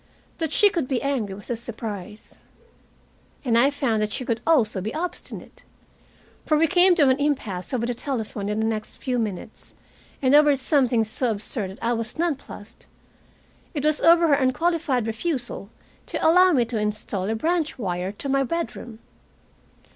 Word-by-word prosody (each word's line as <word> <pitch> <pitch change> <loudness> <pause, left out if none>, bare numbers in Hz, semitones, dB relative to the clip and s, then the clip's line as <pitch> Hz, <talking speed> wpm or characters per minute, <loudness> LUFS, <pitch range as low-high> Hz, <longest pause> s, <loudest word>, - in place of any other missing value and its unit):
That 320 -2 -1
she 410 +5 +5
could 335 -9 -1
be 260 -2 0
angry 245 -9 -1
was 205 +4 -8
a - - 0
surprise. 220 -3 -7 1.0
And 235 -3 +2
I 245 +4 +5
found 265 -7 0
that 215 0 -1
she 255 - -4
could 230 -1 -1
also 225 - +3
be 215 +4 -3
obstinate. 350 +3 -6 0.8
For 305 - +2
we 325 - +4
came 360 +2 +5
to 295 -5 +4
an 260 +2 +2
impasse 240 -11 -2
over 240 -3 -1
the 245 - -1
telephone 220 -6 -4
in 210 - -1
the 220 - +1
next 215 -1 -3
few 250 -2 -2
minutes, 210 -5 -6 0.4
and 260 0 +2
over 295 -1 +6
something 255 -4 +2
so 230 +3 -1
absurd 210 -1 -3
that 190 - -11
I 235 +1 +1
was 230 -1 -4
non 335 0 +1
plussed. 230 -5 -13 0.9
It 290 0 -2
was 305 0 +2
over 335 0 +6
her - - +5
unqualified 280 -1 +1
refusal 240 - -3 0.4
to - - 0
allow 365 +3 +6
me 250 -7 +3
to 230 -1 -3
install 210 -2 -2
a 220 - 0
branch 320 +5 -1
wire 185 -4 -3
to 210 +7 -6
my 275 0 +2
bedroom. 245 -6 -4
245 Hz, 175 wpm, -24 LUFS, 220-295 Hz, 1.0 s, over